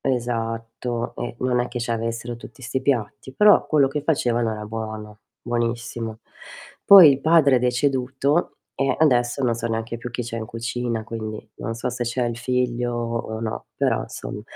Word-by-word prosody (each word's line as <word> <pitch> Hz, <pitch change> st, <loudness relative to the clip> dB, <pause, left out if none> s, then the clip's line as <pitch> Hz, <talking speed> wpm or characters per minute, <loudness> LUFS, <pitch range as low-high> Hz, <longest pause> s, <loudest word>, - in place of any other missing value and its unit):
esatto 115 Hz, -1 st, -2 dB
e 120 Hz, 0 st, -4 dB
non 125 Hz, -1 st, +1 dB
è 125 Hz, -, -2 dB
che 120 Hz, -, -5 dB
ci 120 Hz, -, -3 dB
avessero 115 Hz, +1 st, -3 dB
tutti 130 Hz, +4 st, -13 dB
'sti 125 Hz, +2 st, -2 dB
piatti, 130 Hz, -1 st, -2 dB
però 210 Hz, +6 st, +6 dB
quello 145 Hz, -3 st, +3 dB
che 145 Hz, +2 st, -3 dB
facevano 120 Hz, -7 st, +1 dB
era 105 Hz, -1 st, -6 dB
buono, 110 Hz, -1 st, -6 dB, 0.2 s
buonissimo. 115 Hz, -1 st, -3 dB, 0.6 s
Poi 190 Hz, -6 st, +10 dB
il 135 Hz, 0 st, +1 dB
padre 155 Hz, -4 st, +5 dB
è -, -, +4 dB
deceduto 130 Hz, +4 st, 0 dB, 0.2 s
e 135 Hz, -, +1 dB
adesso 125 Hz, -3 st, +2 dB
non 120 Hz, -2 st, +2 dB
so 115 Hz, 0 st, -3 dB
neanche 115 Hz, +1 st, -3 dB
più 120 Hz, +1 st, -6 dB
chi 120 Hz, +1 st, -3 dB
c'è 115 Hz, 0 st, -5 dB
in 110 Hz, -, -5 dB
cucina, 115 Hz, 0 st, -3 dB
quindi 110 Hz, -1 st, -6 dB
non 115 Hz, -, -4 dB
so 120 Hz, +2 st, -3 dB
se 120 Hz, 0 st, -3 dB
c'è 120 Hz, +1 st, -1 dB
il 120 Hz, -1 st, -3 dB
figlio 125 Hz, -1 st, -1 dB
o 115 Hz, -1 st, -3 dB
no, 110 Hz, -1 st, -4 dB
però -, -, +1 dB
insom -, -, -7 dB
120 Hz, 175 wpm, -23 LUFS, 115-130 Hz, 0.6 s, Poi